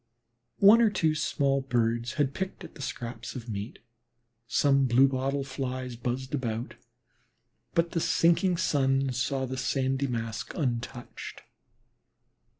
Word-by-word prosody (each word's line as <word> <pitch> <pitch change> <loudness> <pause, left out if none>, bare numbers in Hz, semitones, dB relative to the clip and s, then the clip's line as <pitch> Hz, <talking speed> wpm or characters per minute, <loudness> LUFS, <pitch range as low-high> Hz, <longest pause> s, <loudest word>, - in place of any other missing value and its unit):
One 210 +4 +7
or 225 - +5
two 160 -6 +1
small 140 -2 +1
birds 120 -2 0
had 140 -2 0
picked 190 +3 -4
at - - -10
the 145 - -11
scraps 120 -2 -5
of 125 -2 -7
meat, 105 0 -5 0.7
some 140 +1 +3
blue 130 +3 +5
bottle 135 +1 -1
flies 130 -2 -4
buzzed 125 +3 -4
about, 120 -4 -2 1.0
but 170 0 +2
the 170 - 0
sinking 170 +2 +3
sun 135 -3 +1
saw 130 +2 -1
the 130 +1 -5
sandy 135 +1 0
mask 115 -3 -4
untouched. 120 -4 -4
130 Hz, 130 wpm, -28 LUFS, 120-140 Hz, 1.0 s, One